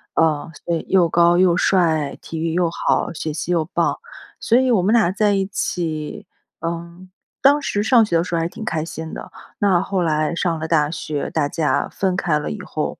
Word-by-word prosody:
呃， 160 0 +1
对， 170 -1 -2
又 180 -3 +4
高 170 +1 +4
又 180 -1 +4
帅、 160 -7 +2
体 160 - -6
育 165 0 -1
又 175 -1 +1
好、 - - 0
学 155 -1 -4
习 165 +3 -3
又 165 -3 +1
棒， - - 0 0.4
所 235 - +1
以 260 - +2
我 230 -6 +4
们 210 +4 +2
俩 220 -7 +4
在 205 +1 +2
一 195 -1 0
起， 160 -6 -3 0.3
嗯， 170 +2 -6 0.3
当 285 +2 +5
时 205 -6 -1
上 230 0 +5
学 170 -5 +1
的 165 - +1
时 175 -1 -3
候 - - +1
还 165 - 0
挺 200 - -9
开 165 -8 -2
心 160 -1 -7
的。 - - -8 0.3
那 190 -4 +3
后 190 -2 -1
来 155 0 0
上 170 -2 -1
了 160 - -4
大 150 -2 +2
学， 150 -2 -4
大 145 -3 0
家 155 -1 0
分 190 -2 -1
开 165 -4 +1
了 150 - -4
以 210 -2 -6
后， 155 - -4
170 Hz, 225 characters per minute, -20 LUFS, 160-190 Hz, 0.4 s, 当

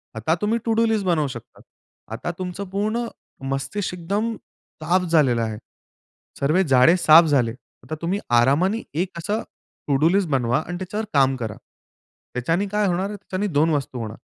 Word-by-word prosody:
आता 115 +9 0
तुम्ही 225 +3 +1
to 225 - +2
do 230 +1 +3
list 220 -3 0
बनवू 165 -5 +2
शकता. 120 -4 -10 0.5
आता 115 +10 -3
तुमचं 185 +2 -4
पूर्ण 215 +4 -1 0.5
मस्तिष्क 180 +9 -3
एकदम 210 +6 -1 0.5
साफ 180 +3 +2
झालेलं 135 -8 +3
आहे. 110 -2 -3 0.8
सर्वे 155 +7 +3
जाळे 130 +8 +6
साफ 165 0 +7
झाले. 135 -7 +2 0.3
आता 155 - -5
तुम्ही 185 +4 -1 0.2
आरामाने 175 - +2 0.2
एक 185 - -2
असा 210 +6 -2 0.5
टू 140 - +2
डू 160 - +5
लिस्ट 190 -2 +1
बनवा 130 0 +1
आणि 175 +1 -4
त्याच्यावर 205 +4 -4
काम 135 -2 +4
करा. 110 -5 -5 0.8
त्याच्याने 165 +11 0
काय 210 +1 0
होणार 185 +2 0
आहे 210 - -5
त्याच्याने 200 +1 -3
दोन 155 +3 +3
वस्तू 135 -4 -2
होणार. 110 0 -6
170 Hz, 170 wpm, -23 LUFS, 135-200 Hz, 0.8 s, साफ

